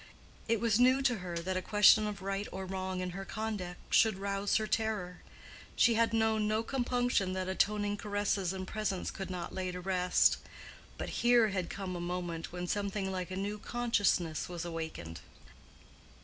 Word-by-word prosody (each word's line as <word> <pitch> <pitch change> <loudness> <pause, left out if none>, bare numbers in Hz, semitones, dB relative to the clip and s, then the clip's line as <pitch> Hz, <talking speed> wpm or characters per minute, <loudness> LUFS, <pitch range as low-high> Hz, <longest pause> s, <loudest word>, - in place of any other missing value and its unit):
It 230 -1 +2
was 230 -1 +2
new 255 +2 +5
to 245 -3 +2
her 175 -2 -5
that 185 +3 -2
a 185 - 0
question 210 +2 +6
of 200 -2 -6
right 195 +1 -2
or 190 0 -5
wrong 185 0 -3
in 180 0 -3
her 195 +2 -6
conduct 205 -4 -5
should 220 -4 +5
rouse 200 +1 -1
her 220 - +2
terror; 215 -5 -2 0.5
she 235 - +5
had 230 +1 +2
known 220 -1 +2
no 215 +1 +1
compunction 245 -6 0
that 185 0 -2
atoning 205 +2 +1
caresses 205 -3 -1
and 190 -1 -5
presents 215 -4 -2
could 195 - -6
not 180 -2 -5
lay 185 -1 -2
to 180 - -6
rest. 180 -1 +3 0.6
But - - -4
here 240 -2 +5
had 185 -3 -2
come 190 -2 -5
a 175 - -4
moment 175 -2 -4
when 180 0 -4
something 200 0 -2
like 185 -1 -3
a 185 - -5
new 205 +2 -3
consciousness 205 -9 0
was 175 -1 -5
awaked. 160 - -6
195 Hz, 175 wpm, -32 LUFS, 180-215 Hz, 0.6 s, question